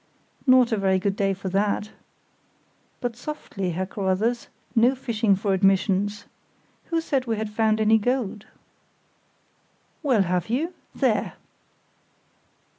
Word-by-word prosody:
"Not 255 Hz, -1 st, +6 dB
a 220 Hz, -, +2 dB
very 190 Hz, -1 st, +2 dB
good 195 Hz, +1 st, -1 dB
day 195 Hz, -1 st, +1 dB
for 190 Hz, 0 st, -5 dB
that! 205 Hz, +2 st, 0 dB, 1.1 s
But 245 Hz, -3 st, -2 dB
softly, 240 Hz, -, -5 dB
Herr 185 Hz, +3 st, -2 dB
Carruthers; 200 Hz, +5 st, -1 dB, 0.3 s
no 240 Hz, +3 st, +4 dB
fishing 225 Hz, -5 st, +1 dB
for 195 Hz, +1 st, 0 dB
admissions. 195 Hz, +1 st, +1 dB, 0.6 s
Who 330 Hz, -1 st, -1 dB
said 275 Hz, -5 st, -1 dB
we 225 Hz, -1 st, 0 dB
had 215 Hz, 0 st, -3 dB
found 220 Hz, 0 st, +2 dB
any 220 Hz, +1 st, +4 dB
gold?" 230 Hz, -3 st, -2 dB, 1.5 s
"Well, 255 Hz, -10 st, +3 dB
have 180 Hz, 0 st, -1 dB
you? 310 Hz, +10 st, -1 dB, 0.2 s
There!" -, -, +1 dB
215 Hz, 120 wpm, -24 LUFS, 195-240 Hz, 1.5 s, Not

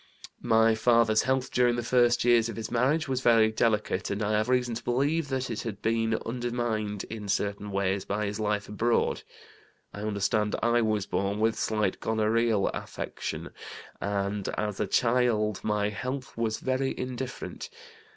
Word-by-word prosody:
"My 115 Hz, -1 st, +4 dB
father's 115 Hz, -1 st, +3 dB
health 130 Hz, 0 st, 0 dB
during 125 Hz, -1 st, +3 dB
the 120 Hz, -, -2 dB
first 120 Hz, 0 st, +3 dB
years 120 Hz, -1 st, +4 dB
of 115 Hz, -, -5 dB
his 115 Hz, -1 st, -5 dB
marriage 140 Hz, +7 st, +1 dB
was 130 Hz, -1 st, -1 dB
very 115 Hz, -3 st, +5 dB
delicate, 105 Hz, -4 st, 0 dB
and 100 Hz, +1 st, -2 dB
I 105 Hz, -, 0 dB
have 110 Hz, +2 st, +1 dB
reason 125 Hz, -2 st, +1 dB
to 115 Hz, -, -5 dB
believe 145 Hz, +6 st, +1 dB
that 130 Hz, -2 st, -2 dB
it 110 Hz, -, -3 dB
had 110 Hz, -4 st, -5 dB
been 115 Hz, 0 st, +1 dB
undermined 115 Hz, -4 st, -2 dB
in 105 Hz, -2 st, -7 dB
certain 100 Hz, +1 st, -1 dB
ways 100 Hz, -1 st, 0 dB
by 105 Hz, +2 st, -2 dB
his 105 Hz, +1 st, -4 dB
life 105 Hz, -1 st, -1 dB
abroad. 115 Hz, +3 st, 0 dB, 0.7 s
I 105 Hz, -, -7 dB
understand 105 Hz, 0 st, 0 dB
I 120 Hz, +1 st, +3 dB
was 110 Hz, -3 st, 0 dB
born 100 Hz, +1 st, -1 dB
with 110 Hz, +1 st, +3 dB
slight 105 Hz, -3 st, -1 dB
gonorrheal 110 Hz, -1 st, +1 dB
affection, -, -, -5 dB, 0.5 s
and 100 Hz, 0 st, -2 dB
as 105 Hz, -2 st, -2 dB
a -, -, 0 dB
child 115 Hz, -4 st, +2 dB
my 105 Hz, -1 st, 0 dB
health 130 Hz, +5 st, -5 dB
was 115 Hz, -1 st, -1 dB
very 130 Hz, +1 st, -1 dB
indifferent. 130 Hz, -, -5 dB
110 Hz, 160 wpm, -28 LUFS, 105-120 Hz, 0.7 s, very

